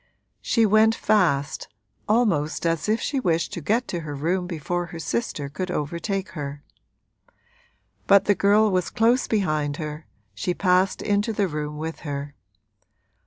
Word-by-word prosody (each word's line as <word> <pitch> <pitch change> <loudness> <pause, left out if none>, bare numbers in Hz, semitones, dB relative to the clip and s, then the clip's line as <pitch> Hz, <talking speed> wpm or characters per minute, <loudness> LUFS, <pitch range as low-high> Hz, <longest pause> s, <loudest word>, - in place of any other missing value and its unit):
She 230 -2 +2
went 215 +2 +4
fast, 160 -10 +1 0.4
almost 190 -10 +1
as 165 +3 0
if 220 +2 +2
she 280 - -1
wished 170 -5 0
to 175 - -4
get 225 - 0
to 175 - -2
her 150 -3 -6
room 175 +5 -1
before 175 +1 -3
her 170 - -8
sister 160 -5 -3
could 165 +6 -5
overtake 180 +5 -2
her. 145 -2 -6 1.4
But 200 -1 +6
the 205 - +4
girl 205 +2 +3
was 185 -2 0
close 240 +2 +2
behind 155 -9 0
her, 155 0 -6 0.3
she 175 - -2
passed 185 0 +2
into 205 +2 +1
the 205 -2 +1
room 150 -2 -4
with 160 +1 -5
her. 145 -1 -5
175 Hz, 150 wpm, -24 LUFS, 150-205 Hz, 1.4 s, But